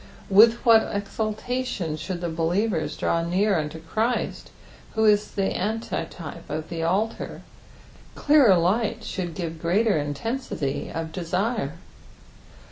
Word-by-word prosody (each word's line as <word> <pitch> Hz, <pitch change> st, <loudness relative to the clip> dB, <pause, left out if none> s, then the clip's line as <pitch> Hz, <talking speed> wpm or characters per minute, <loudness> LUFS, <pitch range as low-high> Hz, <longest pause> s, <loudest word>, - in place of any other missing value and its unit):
With 225 Hz, +4 st, +8 dB
what 225 Hz, -2 st, +6 dB
exultation 215 Hz, -2 st, -2 dB
should 175 Hz, +2 st, -5 dB
betieveis 170 Hz, +3 st, -1 dB
draw 165 Hz, -, +1 dB
near 190 Hz, +5 st, +1 dB
unto 155 Hz, 0 st, -2 dB
Christ, 220 Hz, +9 st, -2 dB, 0.5 s
who 220 Hz, 0 st, +3 dB
is 210 Hz, -1 st, +4 dB
the 195 Hz, -1 st, -1 dB
antitype 180 Hz, -6 st, -4 dB
of 155 Hz, 0 st, -4 dB
the 165 Hz, -1 st, -4 dB
altar 195 Hz, +7 st, -1 dB
I -, -, -21 dB
clearer 280 Hz, -11 st, +6 dB
light 215 Hz, +6 st, +1 dB
should 175 Hz, -6 st, -4 dB
give 165 Hz, -3 st, -5 dB
greater 195 Hz, +2 st, +2 dB
intensity 145 Hz, -, -3 dB
of 165 Hz, 0 st, -4 dB
desire. 180 Hz, -, -1 dB
190 Hz, 120 wpm, -25 LUFS, 165-220 Hz, 0.5 s, With